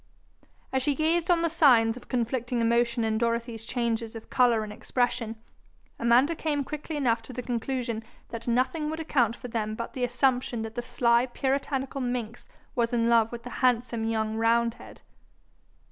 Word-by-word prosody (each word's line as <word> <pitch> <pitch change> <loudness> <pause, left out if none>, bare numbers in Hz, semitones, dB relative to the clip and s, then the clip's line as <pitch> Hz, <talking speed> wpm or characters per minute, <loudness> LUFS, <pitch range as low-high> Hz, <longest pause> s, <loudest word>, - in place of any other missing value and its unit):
As 265 - +2
she 285 +2 +1
gazed 325 +4 +1
on 340 -1 +4
the - - +3
signs 250 -9 +4
of 250 - -12
conflicting 245 0 -1
emotion 235 0 +2
in 220 0 0
Dorothy's 230 -1 -1
changes 230 -2 -2
of 225 - -10
colour 240 -3 +4
and 210 -1 -7
expression, 235 -1 -1 0.6
Amanda 240 +7 +4
came 305 -3 -1
quickly 300 +3 -6
enough 240 -5 +1
to 255 - -11
the 250 - -5
conclusion 240 -1 -2 0.3
that 230 0 -7
nothing 260 +6 +1
would 315 +1 -4
account 245 -8 +1
for 250 - -8
them 215 -2 -2
but 235 +1 -5
the 255 - -3
assumption 245 -2 +1
that 225 0 -6
the 240 - -3
sly 240 0 +2
puritanical 270 +1 -2
minx 245 -2 -4 0.2
was 235 -1 0
in 230 -1 +2
love 230 -1 +4
with 235 -1 -7
the 245 - -8
handsome 240 -2 +2
young 220 -1 -1
roundhead. 230 +1 0
240 Hz, 170 wpm, -27 LUFS, 230-260 Hz, 0.6 s, on